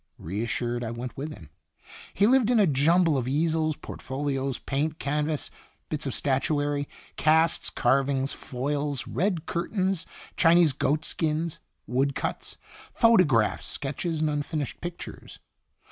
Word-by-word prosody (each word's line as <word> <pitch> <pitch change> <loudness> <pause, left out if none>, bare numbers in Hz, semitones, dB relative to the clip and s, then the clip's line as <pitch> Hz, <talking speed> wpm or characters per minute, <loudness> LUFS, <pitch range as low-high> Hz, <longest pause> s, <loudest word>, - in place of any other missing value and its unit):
Reassured, 120 +6 -2
I 115 - -3
went 120 +2 -6
with 150 +3 -5
him. 80 - -12 0.6
He 200 - +4
lived 245 0 +4
in 245 -2 +4
a 205 - +6
jumble 160 +1 +3
of 125 - -3
easels, 155 +2 +1
portfolios, 135 -2 -3
paint, 150 +3 -2
canvas, 150 +1 -1 0.4
bits 150 -2 -2
of 130 - -3
statuary, 145 +1 0 0.3
casts, 160 +1 +3
carvings, 135 0 +1
foils, 140 0 -3
red 170 - -1
curtains, 185 +1 -1 0.3
Chinese 170 -3 +5
goatskins, 155 +3 -1 0.3
woodcuts, 135 +3 -2 0.3
photographs, 180 - +4
sketches, 155 +3 -3
and 155 - +2
unfinished 145 -1 -3
pictures. 175 0 -8
150 Hz, 115 wpm, -27 LUFS, 135-165 Hz, 0.6 s, a